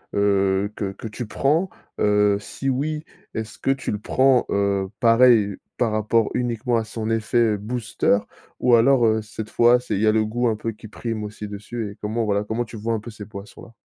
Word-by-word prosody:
heu, 100 Hz, 0 st, +2 dB
que 100 Hz, -2 st, -3 dB
que 110 Hz, -, -8 dB
tu 110 Hz, +1 st, -6 dB
prends? 155 Hz, -, +1 dB, 0.3 s
Heu, 105 Hz, -1 st, +3 dB
si 135 Hz, +5 st, -6 dB
oui, 150 Hz, +4 st, -1 dB, 0.3 s
est-ce 110 Hz, 0 st, -5 dB
que -, -, -2 dB
tu 135 Hz, -1 st, 0 dB
le 105 Hz, -, -3 dB
prends, 130 Hz, +2 st, +3 dB
heu, 100 Hz, -1 st, 0 dB
pareil 115 Hz, -4 st, +5 dB, 0.2 s
par 120 Hz, -3 st, +1 dB
rapport 110 Hz, +1 st, +1 dB
uniquement 120 Hz, 0 st, 0 dB
à 115 Hz, -, 0 dB
son 110 Hz, 0 st, -4 dB
effet, 115 Hz, -1 st, +2 dB
booster 110 Hz, -1 st, 0 dB, 0.4 s
ou 125 Hz, -, +3 dB
alors, 120 Hz, +1 st, +5 dB
heu, 110 Hz, 0 st, +2 dB
cette 110 Hz, 0 st, -8 dB
fois, 120 Hz, +1 st, +5 dB
c'est 125 Hz, -3 st, -5 dB
il 100 Hz, -, 0 dB
y 110 Hz, -, +3 dB
a -, -, +6 dB
le 110 Hz, 0 st, +2 dB
goût 120 Hz, +3 st, 0 dB
un 110 Hz, -, +1 dB
peu 115 Hz, +2 st, -4 dB
qui 110 Hz, 0 st, -12 dB
prime 110 Hz, 0 st, -4 dB
aussi 105 Hz, 0 st, -7 dB
dessus 105 Hz, +1 st, -6 dB
et -, -, -12 dB
comment, 110 Hz, +2 st, -1 dB
voilà? 100 Hz, -1 st, +1 dB
Comment 110 Hz, +3 st, -2 dB
tu 115 Hz, -, -11 dB
vois 115 Hz, +2 st, -2 dB
un 110 Hz, -, -2 dB
peu 115 Hz, +2 st, -9 dB
ces 105 Hz, -1 st, -9 dB
boissons 100 Hz, +1 st, -10 dB
là? 115 Hz, -, -17 dB
110 Hz, 215 wpm, -23 LUFS, 105-120 Hz, 0.4 s, a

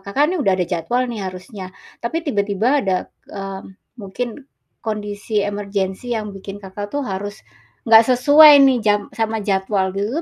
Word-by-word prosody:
Kakak 200 Hz, +9 st, 0 dB
nih -, -, -1 dB
udah 195 Hz, -9 st, +2 dB
ada 180 Hz, -, 0 dB
jadwal 180 Hz, +9 st, -1 dB
nih 235 Hz, -4 st, -5 dB
harusnya, 185 Hz, +1 st, -9 dB, 0.3 s
tapi 325 Hz, +8 st, -3 dB
tiba-tiba 215 Hz, +3 st, +1 dB
ada, 190 Hz, -5 st, 0 dB, 0.3 s
mmm, 195 Hz, -1 st, -8 dB, 0.2 s
mungkin 240 Hz, +7 st, -6 dB, 0.3 s
kondisi 210 Hz, -1 st, -3 dB
emergency 205 Hz, +3 st, -3 dB
yang 210 Hz, -2 st, -5 dB
bikin 195 Hz, +1 st, -9 dB
Kakak 205 Hz, +1 st, -8 dB
tuh 285 Hz, +4 st, -3 dB
harus, 205 Hz, -1 st, -5 dB, 0.5 s
nggak 225 Hz, -1 st, +7 dB
sesuai 290 Hz, +1 st, +8 dB
nih 265 Hz, -2 st, +4 dB
jam 210 Hz, -1 st, +2 dB
sama 225 Hz, -2 st, -2 dB
jadwal 190 Hz, -1 st, 0 dB
gitu 200 Hz, +1 st, -2 dB
205 Hz, 155 wpm, -19 LUFS, 195-240 Hz, 0.5 s, sesuai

